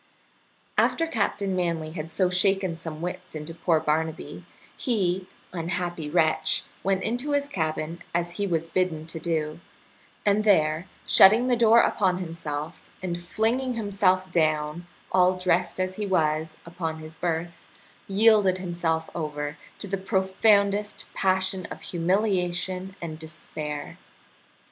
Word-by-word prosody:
After 330 - +3
Captain 200 - -1
Manly 170 -3 -1
had 160 -1 -6
so 180 +2 +1
shaken 190 -1 +2
some 165 -1 -7
wits 180 0 -5
into 155 +2 -5
poor 165 -1 +2
Barnaby 160 +1 -2 0.3
he, 190 -7 0 0.3
unhappy 175 -2 -3
wretch, 160 -1 +2 0.2
went 195 +5 0
to 290 +3 -2
his 285 0 +1
cabin, 160 - -3
as 175 0 -2
he 205 - 0
was 165 -3 0
bidden 165 -2 -1
to 165 0 -6
do, 155 -2 -2 0.7
and 205 +1 +3
there, 160 -4 +3 0.2
shutting 220 +6 +7
the 245 - +4
door 230 0 +6
upon 185 -4 +2
himself, 165 -2 -5
and 175 -2 -1
flinging 235 +8 0
himself 190 -4 +1
down, 155 0 0 0.2
all 185 0 +4
dressed 180 -1 +1
as 185 0 -1
he 210 -1 -2
was, 155 -3 0
upon 165 -2 -4
his 155 0 -9
berth, 170 +1 -3 0.4
yielded 205 -2 +4
himself 170 -3 -1
over 150 -2 -3 0.2
to - - -5
the 195 +1 -1
profoundest 200 +1 +1
passion 190 -1 +1
of - - -9
humiliation 185 0 0
and 155 -2 -5
despair. 155 -2 -6
180 Hz, 130 wpm, -26 LUFS, 160-195 Hz, 0.7 s, shutting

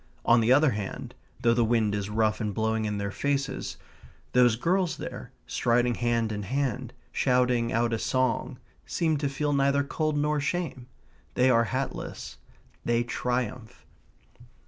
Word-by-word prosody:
On 120 0 +5
the 115 +2 +2
other 145 +1 +5
hand, 105 -3 -5 0.3
though 120 -2 +4
the 120 0 +3
wind 110 -2 +2
is 100 -1 -2
rough 110 +1 +1
and 105 -2 -2
blowing 110 0 0
in 105 -1 -2
their 100 0 -3
faces, 140 +3 -2 0.6
those 125 -2 +5
girls 175 +7 0
there, - - -7
striding 120 +1 +1
hand 115 -1 0
in 105 -1 -3
hand, 130 +3 -2 0.2
shouting 125 -2 +2
out 115 0 +1
a 115 - 0
song, 130 -1 0 0.3
seem 160 -3 +1
to 140 -1 -1
feel 145 +2 -1
neither 140 0 +3
cold 155 +1 -1
nor 150 +1 +1
shame. 145 -4 -3 0.5
They 130 +1 +4
are 115 -1 +4
hatless. 130 +4 -4 0.5
They 120 0 +1
triumph. 120 -1 -3
120 Hz, 150 wpm, -27 LUFS, 110-140 Hz, 0.6 s, On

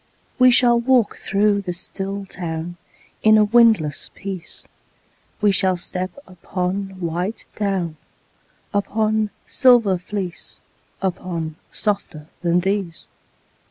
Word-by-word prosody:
We 255 0 +8
shall 240 -1 +5
walk 245 -2 +2
through 200 +1 +1
the 180 -2 -4
still 195 +2 -5
town 175 -2 -5 0.4
In 215 0 +6
a 215 - +6
windless 215 -9 +3
peace; 190 -3 -6 0.8
We 210 -1 +5
shall 185 -1 +3
step 180 +1 -3 0.2
upon 185 +1 -4
white 180 +5 -3
down, 190 -6 -1 0.8
Upon 215 +1 +1 0.2
silver 235 -8 +4
fleece, 185 -1 -5 0.4
Upon 170 -4 -3 0.2
softer 200 -8 -2 0.2
than 175 0 +2
these. 190 -3 -2
195 Hz, 105 wpm, -21 LUFS, 180-210 Hz, 0.8 s, We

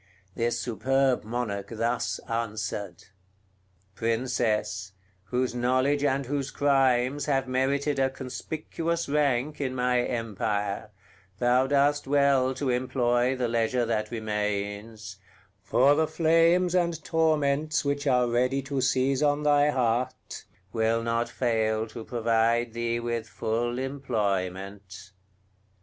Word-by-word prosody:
This 120 +2 -1
superb 130 +3 +1
Monarch 105 -3 -3
thus 115 +1 -1
answered: 105 -5 -4 0.9
"Princess, 110 -4 -1 0.3
whose 125 +4 -1
knowledge 130 +4 +1
and 140 -1 +1
whose 135 +1 -2
crimes 135 -1 +2
have 135 -2 +1
merited 140 +3 0
a 135 0 +3
conspicuous 155 +6 -4
rank 145 0 0
in 130 -2 -2
my 125 0 +2
empire, 105 -3 -2 0.5
thou 125 +4 +3
dost 145 +1 +2
well 135 -2 +3
to 130 -1 -1
employ 125 0 +1
the 125 -2 -1
leisure 115 +1 +1
that 110 -2 -1
remains; 105 -2 -4 0.4
for 125 +8 +4
the 155 +1 +2
flames 165 +3 +3
and 170 -3 0
torments 155 -2 +1
which 145 +1 -1
are 125 -2 +3
ready 125 +3 +1
to 140 0 -2
seize 130 +1 +1
on 145 0 +2
thy 145 0 +4
heart 125 -2 -2 0.3
will 115 0 +1
not 115 0 0
fail 110 -3 0
to 115 +1 -9
provide 115 0 +1
thee 115 0 -1
with 115 -2 -3
full 120 +3 -2
employment." 100 -7 -3
125 Hz, 115 wpm, -27 LUFS, 115-140 Hz, 0.9 s, for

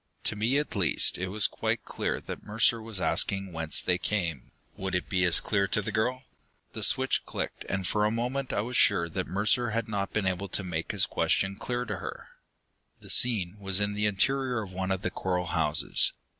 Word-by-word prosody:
To - - +2
me, 115 +6 +1
at 150 -4 -2
least, 90 -4 +2
it 95 - -2
was 105 +2 +1
quite - - -1
clear - - -3
that - - -7
Mercer 110 +2 +1
was 110 -3 -4
asking 95 0 +1
whence 80 -1 +1
they 90 0 +1
came. 85 -12 -2 0.3
Would 95 -1 -3
it 90 - -2
be 95 -2 +1
as 85 - +9
clear 100 -2 0
to 105 - +2
the 105 - -3
girl? 125 +4 -1 0.5
The - - -6
switch - - +3
clicked, - - -5
and 95 -1 -2
for 105 +3 +1
a 105 - +3
moment 125 +4 -2
I - - 0
was 120 +3 -5
sure 95 -7 +4
Mercer 105 +7 0
had 115 +1 -2
not 100 -2 -3
been 105 -2 -1
able 95 +1 -1
to 100 - 0
make 85 -3 -3
his - - +2
question 95 0 0
clear 125 +3 -3
to 105 -4 -4
her. - - -8 0.7
The - - -7
scene 105 -6 +3
was 95 -2 +1
the 105 +1 0
interior 125 +3 0
of 95 -2 -10
one 95 0 -3
of 95 0 -2
the 95 - -1
coral 90 -1 -2
houses. 80 -3 +1
100 Hz, 205 wpm, -28 LUFS, 95-110 Hz, 0.7 s, as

